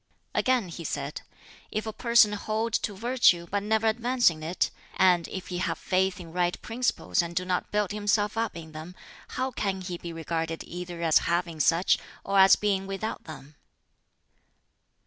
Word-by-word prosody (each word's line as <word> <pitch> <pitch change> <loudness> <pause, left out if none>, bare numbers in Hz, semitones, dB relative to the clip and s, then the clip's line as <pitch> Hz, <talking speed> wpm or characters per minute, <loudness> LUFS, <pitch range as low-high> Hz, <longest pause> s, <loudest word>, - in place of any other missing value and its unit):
Again 250 -7 +1
he 170 0 -7
said, - - -4 0.5
"If 215 - -3
a 220 - -4
person 235 -3 +4
hold 220 +2 -2
to 210 - 0
virtue 230 -7 +3
but 200 0 0
never 220 +2 +1
advance 240 0 +3
in 155 -1 -10
it, 165 +4 -1 0.2
and 180 -3 +4
if 190 - -7
he 180 -1 -3
have 170 -2 -1
faith 190 +1 0
in 165 -2 -10
right 175 0 0
principles 225 - 0
and 170 0 -6
do 180 +1 0
not 180 -1 -1
build 210 -2 0
himself 205 0 0
up 225 -5 -2
in 160 -1 -9
them, 155 +3 -9 0.4
how 260 +1 -1
can 195 -5 -2
he 180 -2 -5
be 170 - -6
regarded 165 0 -3
either 175 -1 -7
as 160 -2 +5
having 170 -2 -1
such, 165 +5 +3 0.2
or 195 0 +2
as 190 0 +8
being 195 -2 -1
without 195 +3 -4
them?" 145 -1 -10
190 Hz, 175 wpm, -27 LUFS, 170-215 Hz, 0.5 s, as